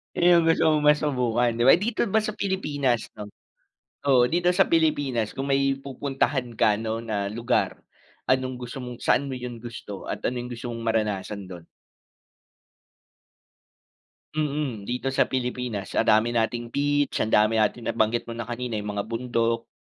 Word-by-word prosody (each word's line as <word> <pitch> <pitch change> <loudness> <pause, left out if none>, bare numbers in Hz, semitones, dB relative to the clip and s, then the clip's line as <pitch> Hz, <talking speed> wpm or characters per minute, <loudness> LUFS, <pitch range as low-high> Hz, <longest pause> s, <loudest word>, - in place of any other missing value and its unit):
Ayun 175 +1 +4
yung - - -1
gusto 165 - +3
mong 150 -1 +1
masubukan 125 -5 +1
di 120 - 0
ba? - - +9
Dito 220 +6 -1
ba 220 +2 +2
sa 215 - -2
Pilipinas 145 - -1
'no? 105 - -6 0.8
Oo, 125 -2 +6
dito 175 +5 +2
sa 180 +1 +3
Pilipinas 145 -9 +1
kung 135 +1 -4
may 135 0 +1
pupuntahan 135 -1 -2
ka 105 - +4
'no 110 +1 -3
na 105 -3 -3
lugar, 120 +3 0 0.5
anong 130 -1 0
gusto 125 +2 -7
mong 125 -1 -7
saan 140 +1 +1
mo - - -3
yung 120 -2 -7
gusto 110 -4 -8
at - - -3
ano 120 0 -2
yung 125 - -8
gusto 120 +1 -6
mong 115 - -6
maranasan 105 -3 -1
dun? 90 -2 -9 2.7
Mm, 145 -7 -2
dito 125 +2 -3
sa - - +3
Pilipinas. 125 -5 -3
Ang 115 - +1
dami 110 +2 +4
nating 120 +1 -1
beach, 145 0 +1
ang 110 - -2
dami 110 +1 +4
natin 110 +2 0
nabanggit 110 +2 0
mo 115 - -6
kanina, 120 0 -4
yung 105 0 -5
mga 100 - -2
bundok. 115 0 -1
125 Hz, 165 wpm, -25 LUFS, 115-140 Hz, 2.7 s, ba